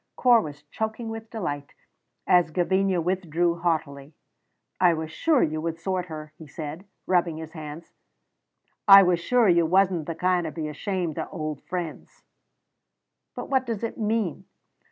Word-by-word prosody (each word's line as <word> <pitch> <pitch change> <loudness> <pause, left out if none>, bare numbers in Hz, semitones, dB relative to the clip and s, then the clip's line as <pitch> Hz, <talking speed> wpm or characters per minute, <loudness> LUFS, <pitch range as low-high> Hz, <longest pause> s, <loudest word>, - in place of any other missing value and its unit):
Corp 240 -3 +5
was 150 -1 -9
choking 220 +9 -4
with 225 0 -7
delight 145 -10 -5 0.5
as 175 -2 +4
Gavinia 190 +2 +1
withdrew 175 -1 0
haughtily. 155 -4 -2 0.6
"I 175 -2 +5
was 160 0 -5
sure 305 - +2
you 155 0 -1
would 165 0 -3
sort 185 +1 -2
her," 155 -2 -8
he 160 - -11
said, 155 +5 -7 0.2
rubbing 175 -3 +1
his 160 0 -8
hands, 155 0 -9 0.9
"I 195 0 +11
was 180 -2 +2
sure 240 +5 +3
you 170 -2 +4
wasna 185 -1 +3
the 165 +2 -5
kind 180 0 +1
to 160 - -3
be 155 -1 -4
ashamed 175 +1 -3
o' - - -2
auld 155 -5 -5
friends." 175 -3 -6 1.1
"But - - -6
what 260 -2 +2
does 230 -2 -3
it 230 - -4
mean?" 215 -5 -1
175 Hz, 155 wpm, -25 LUFS, 155-195 Hz, 1.1 s, I